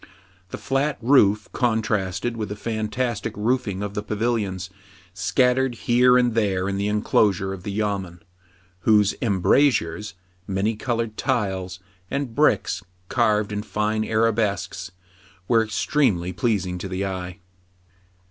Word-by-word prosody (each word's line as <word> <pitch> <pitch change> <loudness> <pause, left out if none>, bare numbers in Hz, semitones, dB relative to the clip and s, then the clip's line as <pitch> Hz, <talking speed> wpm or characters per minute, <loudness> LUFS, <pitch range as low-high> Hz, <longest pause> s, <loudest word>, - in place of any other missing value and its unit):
The - - -6
flat 135 +2 -1
roof 110 -5 +4
contrasted 110 -2 0
with 110 -3 -4
the 105 - -4
fantastic 110 0 -3
roofing 105 -3 -1
of 100 -1 -4
the 105 - -2
pavilions, 105 -4 -2 0.4
scattered 125 +5 +1
here 125 +2 +4
and 120 -2 +2
there 95 -4 +1
in 100 0 -2
the 100 +1 -1
enclosure 100 -2 +1
of 95 - -8
the 100 - -5
yamen, 100 -5 -3 0.6
whose 105 +1 +4
embrasures, 105 - +2 0.3
many 100 +3 0
colored 115 -1 -2
tiles, 95 -8 -1 0.3
and 140 -4 -3
bricks 150 -5 +2 0.3
carved 105 -4 +2
in 105 0 -2
fine 105 0 -1
arabesques, 105 -5 0 0.6
were 115 -2 +4
extremely 105 - 0
pleasing 95 -4 -1
to 95 - -5
the 95 +1 -2
eye. 90 -1 -5
105 Hz, 125 wpm, -23 LUFS, 95-115 Hz, 0.6 s, roof